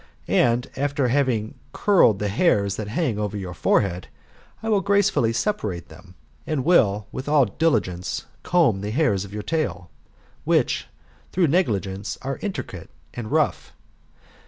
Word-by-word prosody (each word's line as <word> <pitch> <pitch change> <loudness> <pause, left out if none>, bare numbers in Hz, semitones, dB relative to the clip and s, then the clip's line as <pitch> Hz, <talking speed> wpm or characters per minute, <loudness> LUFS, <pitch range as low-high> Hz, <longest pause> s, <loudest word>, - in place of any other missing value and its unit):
And, 120 +1 +2
after 140 -1 0
having 120 -5 0
curled 185 - +4
the 105 - -2
hairs 100 - +2
that 110 - -4
hang 115 -1 -1
over 105 0 -2
your 95 -3 -5
forehead, 90 -1 +1 0.6
I - - -4
will 210 -3 +3
gracefully 200 - +2
separate 105 - -2
them; 90 0 -15 0.3
and 145 -4 -1
will, 105 - +3
with 130 +3 -5
all 145 -3 +5
diligence, 95 - -1 0.2
comb 155 - +2
the 105 - -3
hairs 110 - +1
of 100 - -12
your 105 0 -5
tail, 130 - -2 0.5
which, - - +1 0.4
through 175 -4 +2
negligence, 105 - -1
are 135 +1 -3
intricate 200 -3 -5 0.2
and 115 -3 -6
rough. - - 0
115 Hz, 140 wpm, -23 LUFS, 100-155 Hz, 0.6 s, all